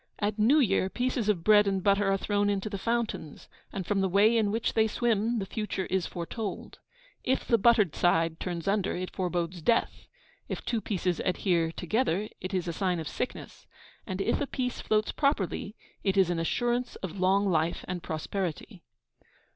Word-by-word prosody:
At 210 +1 -1
New 240 +8 +5
Year 195 -7 +2
pieces 245 -1 -1
of 180 -6 +1
bread 210 0 +6
and 195 -2 0
butter 200 0 +3
are 195 - +2
thrown 205 +1 0
into 200 +1 -1
the 200 - -4
fountains, 230 -9 -3 0.2
and 190 -2 -4
from 200 +1 +1
the 190 - +1
way 205 +5 +4
in 220 -3 +2
which 225 +2 -1
they 220 0 +3
swim 230 0 +1
the 200 - -2
future 210 -2 -3
is 190 -2 +1
foretold. 195 +4 -5 0.4
If 260 - 0
the 230 - +3
buttered 215 -6 +4
side 165 -2 +2
turns 175 -2 -4
under, 200 -1 +1
it 185 +1 -5
forebodes 175 -2 -2
death; 230 +8 0 0.4
if - - -5
two 230 -2 -1
pieces 180 -4 -1
adhere 175 -3 +1
together, 210 +2 0
it 185 - -5
is 180 -2 -1
a 170 - -2
sign 180 0 0
of 160 - -5
sickness; 250 - -6 0.4
and 185 +1 -3
if - - 0
a 285 - -1
piece 250 -2 -3
floats 215 0 +1
properly, 220 - -1 0.3
it 195 -1 +1
is 185 -2 +4
an 170 - -1
assurance 240 +8 -1
of 190 0 -5
long 195 +2 +3
life 165 -2 0
and 180 -1 -4
prosperity. 175 +4 -4
195 Hz, 185 wpm, -28 LUFS, 180-220 Hz, 0.4 s, bread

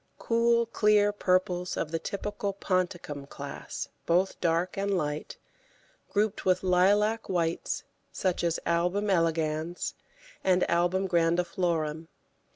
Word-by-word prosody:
Cool 235 0 +2
clear 210 -2 +3
purples 185 -2 0
of 155 - -2
the 165 - -1
typical 200 +3 -3
ponticum 175 -7 -2
class, 140 0 -6 0.2
both 180 +3 +1
dark 170 +1 +1
and 195 0 0
light, 150 -2 -3 0.7
grouped 210 0 0
with 185 0 +2
lilac 205 +5 +3
whites, 170 -3 -1 0.3
such 185 -2 -1
as 170 -1 +1
Album 180 +5 +1
elegans 165 -1 0 0.5
and 185 -1 +3
Album 175 +3 +1
grandiflorum. 170 -2 0
180 Hz, 110 wpm, -28 LUFS, 165-200 Hz, 0.7 s, clear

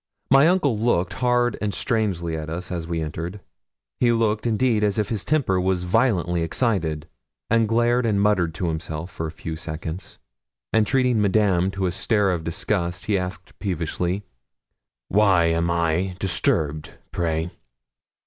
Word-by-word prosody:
My 135 +3 +7
uncle 150 - +2
looked 100 -6 +1
hard 120 -1 +1
and 105 -1 -1
strangely 95 -9 -1
at 80 -1 -5
us 90 +3 -5
as 85 -2 -3
we 85 -1 -2
entered. 85 +5 -5 0.6
He 120 - +4
looked, 115 -1 +1
indeed, 115 -1 +2
as 105 -1 +1
if 105 -2 0
his 110 -4 -1
temper 125 -12 +1
was 90 -1 0
violently 90 -4 +1
excited, 80 -5 -1 0.4
and 115 -1 +4
glared 120 +1 +2
and 105 -3 +1
muttered 95 -6 +2
to 90 +1 -2
himself 80 +1 -4
for 80 -1 -4
a - - -6
few 80 -1 -6
seconds; 80 +2 -6 0.6
and 110 -2 +3
treating 125 -4 +2
Madame 95 -3 +2
to 95 0 -2
a 90 - +1
stare 100 +1 +1
of 85 -3 -2
disgust, 85 +2 -2
he 105 - +1
asked 90 0 -4
peevishly 90 +1 -2 0.8
'Why 95 -4 +4
am 85 +1 +1
I 85 +2 0
disturbed, 80 -5 -1
pray?' 80 0 -1
95 Hz, 155 wpm, -23 LUFS, 85-110 Hz, 0.8 s, My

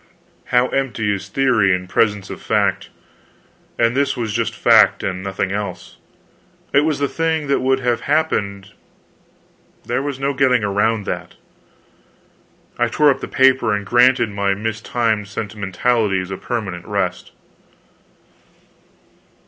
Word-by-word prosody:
How 125 +1 +2
empty 120 -6 -1
is 95 -1 -5
theory 110 -7 +2
in 90 0 -6
presence 105 0 0
of - - -8
fact! - - 0 0.9
And 115 +1 +2
this 140 -1 0
was 115 -4 -3
just 115 0 -1
fact, - - +4
and 95 -1 -3
nothing 95 0 -3
else. 100 0 -5 0.8
It 140 - +6
was 155 -3 0
the 140 - 0
thing 160 0 -1
that 140 -1 +1
would 130 +1 +1
have 120 -2 0
happened, 105 -10 -1 1.1
there - - -1
was 140 -1 -4
no 140 +1 -1
getting 130 -3 +2
around 105 +1 0
that. - - -5 1.4
I - - +3
tore 150 -1 +3
up - - -2
the - - -6
paper 130 -5 +3
and 105 0 -4
granted 120 0 +3
my 100 -1 0
mistimed 110 0 -2
sentimentalities 100 -1 -1
a 95 - -4
permanent 95 -8 -5
rest. - - -2
115 Hz, 130 wpm, -19 LUFS, 100-130 Hz, 1.4 s, It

